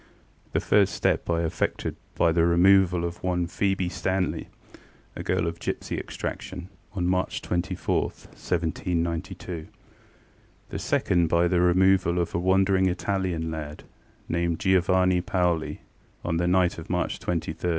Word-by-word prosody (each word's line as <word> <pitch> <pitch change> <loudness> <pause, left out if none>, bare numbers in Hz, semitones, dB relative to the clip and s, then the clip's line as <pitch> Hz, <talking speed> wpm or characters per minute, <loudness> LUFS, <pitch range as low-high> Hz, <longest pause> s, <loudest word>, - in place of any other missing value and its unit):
The - - +2
first 100 -4 +3
step - - 0
I 85 0 +1
effected 80 - -2 0.2
by 85 - +3
the 85 0 +3
removal 90 0 +4
of 85 0 -5
one 90 -1 0
Phoebe 95 +1 0
Stanley, 95 0 -1 0.7
a - - -5
girl - - 0
of 85 0 -3
gipsy - - -3
extraction, 90 0 -6 0.3
on 90 -2 -1
March 90 +1 0
24, 85 -1 0
1792. 85 0 -3 1.0
The - - -4
second, 85 -2 +1
by 85 +2 +3
the 90 0 +2
removal 90 0 +4
of 85 -1 -1
a - - 0
wandering 95 +1 +3
Italian 90 -3 -1
lad, 75 -1 -6 0.4
named 85 -1 0
Giovanni 95 -1 +3
Paoli, 90 -3 0 0.4
on 85 -1 0
the 85 +1 +1
night 90 -1 +2
of 80 - -10
March - - -1
23, - - -16 0.2
1805. 90 +2 -3
90 Hz, 140 wpm, -26 LUFS, 85-95 Hz, 1.0 s, removal